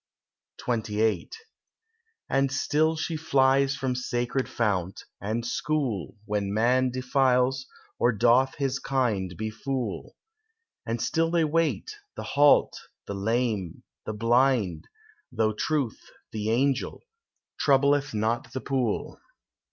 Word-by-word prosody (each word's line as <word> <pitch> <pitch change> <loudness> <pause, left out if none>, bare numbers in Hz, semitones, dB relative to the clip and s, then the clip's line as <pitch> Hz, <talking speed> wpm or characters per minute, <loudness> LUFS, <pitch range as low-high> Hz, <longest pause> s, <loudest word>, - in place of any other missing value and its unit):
XXVIII 110 -2 0 1.0
And 135 0 +1
still 155 +3 +1
she 160 +1 -3
flies 135 -3 +3
from 130 -2 -1
sacred 125 +1 -2
fount, 95 -5 -1 0.2
and 110 +3 -2
school, 120 - -2
When 105 -2 -1
man 125 +4 +2
defiles, 130 +1 +1 0.3
or 120 - +4
doth 120 +4 +3
his 135 -2 -1
kind 110 -11 -1
befool; 115 +4 -4 0.7
And 115 +1 -1
still 165 +7 +1
they 170 -1 +2
wait, 165 - 0 0.2
the - - -5
halt, 145 0 +4 0.3
the - - -5
lame, 105 -3 -1 0.2
the 110 - -2
blind, 115 - +2 0.4
Though 110 -1 +1
Truth, 140 0 -1 0.3
the 110 0 -3
angel, 135 +4 0 0.6
troubleth 140 0 +3
not 115 +4 -1
the 130 - -3
pool. 130 -6 -2
125 Hz, 110 wpm, -27 LUFS, 110-135 Hz, 1.0 s, or